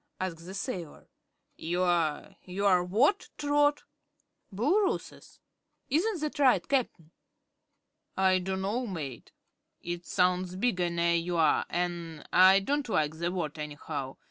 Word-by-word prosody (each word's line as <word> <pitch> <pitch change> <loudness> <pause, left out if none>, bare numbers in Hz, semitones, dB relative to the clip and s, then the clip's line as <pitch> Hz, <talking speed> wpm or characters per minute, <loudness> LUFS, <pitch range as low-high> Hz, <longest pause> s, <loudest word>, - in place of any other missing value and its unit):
asked 170 -2 -5
the 190 - -7
sailor. 185 - -6 0.5
"You're 170 -3 0
you're 185 -1 +2
what, 240 - +2
Trot?" 290 0 +2 0.7
"Booloorooess. 320 - -1 0.5
Isn't 350 +4 +1
that 305 0 -3
right, 265 -3 +4
Cap'n?" 230 - -1 1.1
"I 190 -1 +4
dunno, 190 +6 -2
mate. 145 - -6 0.5
It 175 0 -6
sounds 180 0 +1
bigger 185 -4 0
ner 170 0 +1
you 170 +1 0
are, 160 -2 +3
an' 170 -3 -3
I 190 +2 +7
don't 280 +4 -1
like 155 -5 0
the 170 +1 -1
word, 165 -4 -4
anyhow. 145 -2 -5
180 Hz, 115 wpm, -29 LUFS, 170-235 Hz, 1.1 s, I